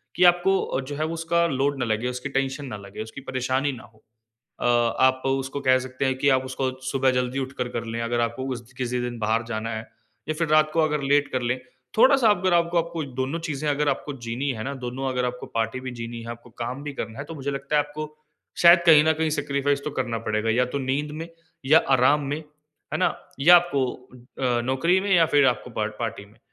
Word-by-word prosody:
कि 180 - +2
आपको 175 +2 +5
अ, - - -2
जो 140 +2 -6
है 155 +2 -1
उसका 170 +1 +1
लोड 140 0 0
ना 120 - 0
लगे, 110 +2 -1
उसकी 125 +3 -4
टेंशन 135 +1 -1
ना 115 -6 -6
लगे, 100 0 -9
उसकी 110 +5 -10
परेशानी 130 +2 -1
ना 125 - -9
हो। 110 - -24 0.6
अ, - - -4
आप 120 +2 +3
उसको 135 +1 -1
कह 130 -1 +4
सकते 130 +1 -4
हैं 130 -1 +1
कि 140 - +2
आप 130 - -3
उसको 130 0 -2 0.2
सुबह 135 -1 +2
जल्दी 125 +1 -2
उठकर 130 -2 -3
कर 115 - -2
ले 115 +1 -4
अगर 120 0 0
आपको 120 +3 -2
उस 120 0 -11
किसी 125 -1 -1
दिन 120 -1 -4
बाहर 110 +1 +1
जाना 110 0 -3
है 110 - -4 0.5
या 155 - 0
फ़िर 165 0 -1
रात 155 0 +4
को 165 - +2
अगर 150 -2 +1
लेट 145 0 +3
कर 130 - -1
ले 120 +1 0 0.4
थोड़ा-सा 260 -1 +6
अगर 185 -2 +2
आपको 170 0 +2
आपको 170 -1 -2 0.2
दोनों 135 +5 -1
चीज़े 150 0 -3
अगर 145 0 +1
आपको 145 +1 -2
जीनी 120 +5 -2
है 110 -3 -6
ना, 140 +1 -3
दोनों 130 +1 -4
अगर 125 -1 -1
आपको 125 0 -4
पार्टी 115 +2 -1
भी 130 0 -5
जीनी 115 0 -6
है, 115 - -9
आपको 120 +1 -10
काम 120 +4 -5
भी 145 0 -5
करना 115 -3 -6
है 140 - -4
तो 165 - -8
मुझे 140 -1 -4
लगता 140 +2 -2
है 150 - +5
आपको 150 +1 -8 0.5
शायद 170 +1 +9
कहीं 150 -2 +8
न 160 - +4
कहीं 160 0 -1
सैक्रिफाइस 145 -1 0
तो 150 - -2
करना 120 -3 -1
पड़ेगा 110 +1 0
या 125 +3 +3
तो - - +1
नींद 140 +3 -1
में 165 - -6 0.4
या 155 +4 +7 0.2
आराम 130 +4 +4
में, 145 +2 -1 0.6
है - - 0
ना? - - +3 0.3
या 175 +5 +9
आपको 170 -6 +2 0.6
अ, 125 -2 +1
नौकरी 135 +9 +2
में 200 +1 -3
या 170 -2 +5
फ़िर 145 -3 +4
आपको 120 0 0
पार्ट 110 -1 -2
पार्टी 110 -3 -4
में। 105 +2 -23
135 Hz, 235 wpm, -24 LUFS, 120-150 Hz, 0.6 s, शायद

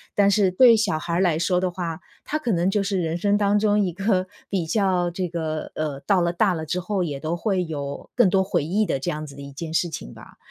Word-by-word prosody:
但 200 -1 +4
是 200 -2 +3
对 235 +5 +7
小 210 -7 +1
孩 170 +2 -4
儿 - - +2
来 175 -5 +2
说 180 +2 +1
的 185 0 0
话， 170 -2 -4 0.3
他 305 - -2
可 245 -6 -1
能 175 -1 +2
就 205 +1 +1
是 195 -1 -1
人 165 -1 -1
生 205 +3 +2
当 205 0 +2
中 210 0 +2
一 190 -3 +1
个 190 0 0 0.2
比 185 -4 -1
较 180 0 +1
这 180 +1 -2
个 160 -2 -4
呃， 150 -3 -3
到 185 +5 +2
了 170 0 +1
大 190 +2 +2
了 160 -2 -4
之 175 +4 -2
后 190 +1 -1
也 145 -5 -4
都 160 +4 -2
会 185 +1 0
有 140 -3 -6
更 240 -6 +5
多 190 +1 +3
回 190 - 0
忆 195 +8 +1
的 135 - -1
这 135 - -2
样 155 0 -5
子 140 -2 -11
的 140 - -10
一 140 0 -9
件 160 +3 -6
事 175 +1 +1
情 60 - -7
吧。 - - -14
180 Hz, 285 characters per minute, -23 LUFS, 160-200 Hz, 0.3 s, 对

